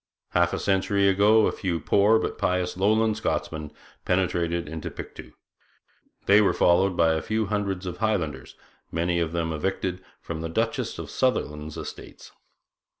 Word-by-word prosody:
Half 85 0 +2
a - - -2
century 100 0 +1
ago 105 +3 +5
a - - +1
few 90 -4 -2
poor 105 +5 +4
but - - -3
pious 90 -1 0
Lowland 110 +3 +2
Scotsmen 80 -8 -3 0.3
penetrated 85 -2 0
into 80 +1 -5
Pictou. - - -10 0.9
They 100 +2 +6
were 100 - +2
followed 90 +1 +3
by 80 -1 +4
a 80 - -1
few 110 0 -1
hundreds 100 -2 -2
of 90 -1 -5
Highlanders, 85 - -2 0.4
many 85 +1 0
of 80 -2 -1
them 80 -1 -2
"evicted" 90 +3 -2 0.2
from 80 -1 -6
the 80 - -4
Duchess 80 - -1
of - - -7
Sutherland's 75 - -1
estates. - - -9
90 Hz, 150 wpm, -25 LUFS, 85-100 Hz, 0.9 s, They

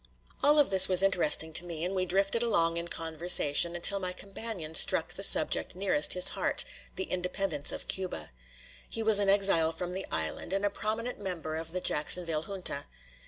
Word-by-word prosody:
All 295 +1 +2
of 290 -8 +1
this 190 -1 +6
was 185 0 +7
interesting 160 -4 +2
to 175 - +1
me; 170 -1 -7
and 185 - -5
we 185 -1 -2
drifted 195 +5 -1
along 170 -8 -1
in 170 0 -5
conversation 165 0 +1
until 200 +3 +3
my 180 -1 -6
companion 195 -4 -8
struck - - +3
the - - -9
subject - - +3
nearest 185 -6 +1
his 180 - +7
heart, - - -1 0.3
the 190 - -4
independence 180 -4 -2
of - - -8
Cuba. 180 - -4 0.6
He 225 - -5
was 215 -2 +4
an 200 -1 0
exile 195 -5 +1
from 175 +2 -8
the 190 +1 -6
island, 80 - -6
and 195 +1 -3
a 205 - -2
prominent 230 +3 -5
member 175 -5 -6
of 165 0 -7
the 185 +1 -5
Jacksonville 160 0 0
Junta. 185 -7 -3
180 Hz, 185 wpm, -27 LUFS, 165-195 Hz, 0.6 s, was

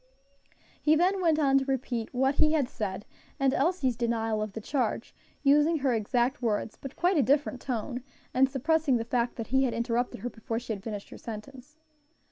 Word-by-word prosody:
He 310 +1 +4
then 370 +4 +2
went 325 -3 +3
on 275 -3 +4
to 270 - -3
repeat 250 -4 -2
what 265 +2 +2
he 305 +2 +3
had 290 -5 +2
said, 205 -4 -4 0.3
and 270 -1 +3
Elsie's 275 -4 +1
denial 225 -2 0
of 215 -2 -4
the 225 - -5
charge, 255 +4 -2 0.3
using 295 +3 +4
her 270 -3 +1
exact 240 +4 0
words, 220 -2 -1
but 275 0 -9
quite 355 +1 +2
a - - +6
different 270 0 +1
tone, 250 0 -3 0.3
and 265 +1 +4
suppressing 285 0 +2
the 230 - -3
fact 240 0 0
that 230 -2 -6
he 265 0 +4
had 245 - -1
interrupted 240 +1 -1
her 245 - -3
before 225 0 -4
she 235 -1 -3
had 200 - -7
finished 205 -3 -6
her - - -10
sentence. 255 +6 -9
255 Hz, 195 wpm, -28 LUFS, 230-285 Hz, 0.3 s, a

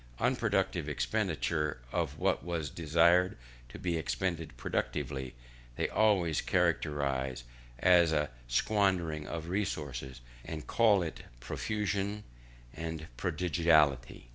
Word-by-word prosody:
Unproductive - - 0
expenditure 75 +4 -1
of - - -1
what - - +1
was 80 -4 -3
destined 85 +3 +3 0.3
to - - -9
be 85 -2 -1
expended 80 -3 -2
productively, 65 0 -3 0.4
they - - 0
always 95 -8 +2
characterise 65 -4 0 0.3
as 85 +3 +5
a 75 -3 0 0.2
squandering 85 - +1
of 85 -1 -5
resources, 70 -10 -3 0.2
and 80 -2 -6
call 105 -5 +4
it 80 - -6 0.2
profusion 100 - -2 0.5
and 80 -1 -5
prodigality. 75 -6 +2
80 Hz, 100 wpm, -31 LUFS, 70-90 Hz, 0.5 s, as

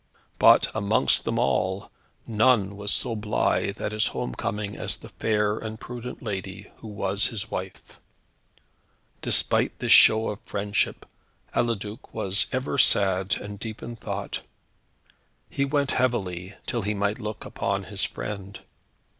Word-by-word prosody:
But, - - +7
amongst 105 0 +2
them - - -1
all, 95 +1 0 0.3
none 110 -3 +3
was 100 0 -4
so 120 -3 +2
blithe 105 -1 0
at - - -2
his 105 0 +2
home 60 - -3
coming 105 +8 -3
as - - 0
the - - -12
fair 105 -1 0
and 110 0 -6
prudent 125 +1 -7
lady 100 -2 -5
who - - -11
was 100 -1 0
his 110 -1 -3
wife. 95 0 -7 1.2
Despite - - +3
this - - -1
show 110 +1 +7
of 105 0 -6
friendship, 100 0 -2 0.5
Eliduc 110 -2 -2
was 100 -2 +1
ever 130 +2 -1
sad, 95 -3 +4
and 105 0 -8
deep 110 0 -7
in 120 - -6
thought. - - -4 1.1
He 140 - -1
went 140 0 0
heavily, 95 -7 -1
till 120 - -2
he 105 +1 -1
might 100 +3 -1
look 105 -2 -6
upon - - -2
his - - +1
friend. 100 -1 -5
105 Hz, 140 wpm, -26 LUFS, 100-110 Hz, 1.2 s, But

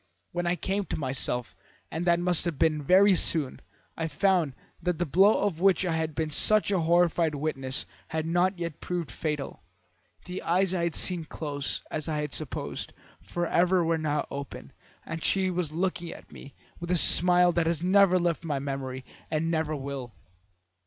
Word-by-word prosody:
When 175 0 -2
I 175 - +2
came 195 +2 -2
to - - -4
myself, 130 -3 -2 0.4
and 165 +3 -3
that 170 -1 +3
must 175 -1 +1
have 170 -5 -2
been 155 -1 +2
very 190 +7 +5
soon, 160 -5 0 0.3
I 165 - -2
found 175 -6 +1 0.3
that 180 -2 -1
the 175 - 0
blow 195 +7 +4
of 195 -6 -1
which 190 -1 +4
I 170 -2 0
had 160 -2 -2
been 155 -1 -2
such 215 +7 +3
a 190 - +2
horrified 170 -1 +2
witness 135 -2 -3 0.2
had 160 0 -3
not 175 +3 +1
yet 170 -3 -5
proved 175 -3 -3
fatal. 150 -3 -4 0.6
The 180 +1 -5
eyes 185 +2 +1
I 170 -2 0
had 170 - -2
seen 175 -3 0
close, 145 -2 -4
as 155 0 -3
I 155 - -1
had 150 -1 -4
supposed, 155 -5 -4 0.3
forever, 175 +1 +1
were 165 0 +1
now 150 -1 -1
open, 140 -1 -7 0.3
and 165 -1 -5
she 190 -1 +1
was 175 -4 -2
looking 175 0 -2
at - - -13
me 140 - -12 0.2
with 170 - -6
a 180 - +3
smile 180 +1 +6
that 170 -1 0
has 165 0 -1
never 190 0 +5
left 170 -2 0
my 150 -4 -2
memory, 135 -2 -5 0.2
and 160 +1 -1
never 160 -1 -1
will. 135 -4 -6
165 Hz, 180 wpm, -27 LUFS, 150-180 Hz, 0.6 s, smile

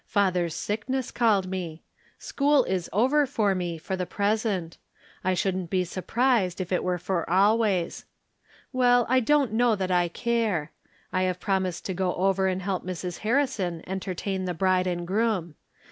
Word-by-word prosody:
Father's 180 -5 +1
sickness 245 +5 -2
called 210 -6 +2
me. 175 -4 -5 0.3
School 285 -1 +2
is 185 -5 -2
over 265 +8 +3
for 215 -7 +1
me, 175 -3 -3
for 180 +4 -4
the 180 -1 -3
present; 200 -5 -1 0.4
I 185 0 +1
shouldn't 185 -2 -1
be 185 0 +1
surprised 195 +1 0
if 185 -1 -4
it 180 - +1
were 180 -1 0
for 175 -1 -2
always. 195 -1 +2 0.7
Well, 245 -1 +4
I 260 +1 +4
don't 275 -2 +2
know 235 0 +3
that 190 -2 -2
I 175 -1 +3
care. 210 -5 -1 0.4
I 185 - +1
have 180 0 -4
promised 190 -3 -1
to 190 - -2
go 180 0 -1
over 190 +1 +2
and 185 0 -1
help 190 -1 -2
Mrs. 180 -1 -5
Harrison 220 - 0
entertain 190 0 -3
the 180 -1 -3
bride 185 +1 +2
and 175 -1 -2
groom. 195 -4 0
190 Hz, 160 wpm, -26 LUFS, 180-225 Hz, 0.7 s, Well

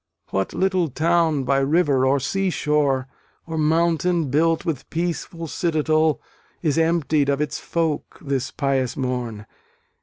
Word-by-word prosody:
What 95 0 -1
little 185 -2 +1
town 160 0 +2
by 135 +1 +2
river 140 -2 +2
or 140 +1 +3
sea 195 +8 -1
shore, 145 -5 +1 0.4
Or 165 - -5
mountain 165 0 +1
built 165 +3 +2
with 155 -6 -3
peaceful 170 0 -3
citadel, 155 -1 +1 0.4
Is 155 -1 +2
emptied 160 -3 +2
of 140 0 +1
its 150 0 -2
folk, 165 -3 -2
this 135 -3 -2
pious 135 -3 -1
morn? 125 -5 -3
155 Hz, 130 wpm, -22 LUFS, 135-165 Hz, 0.4 s, or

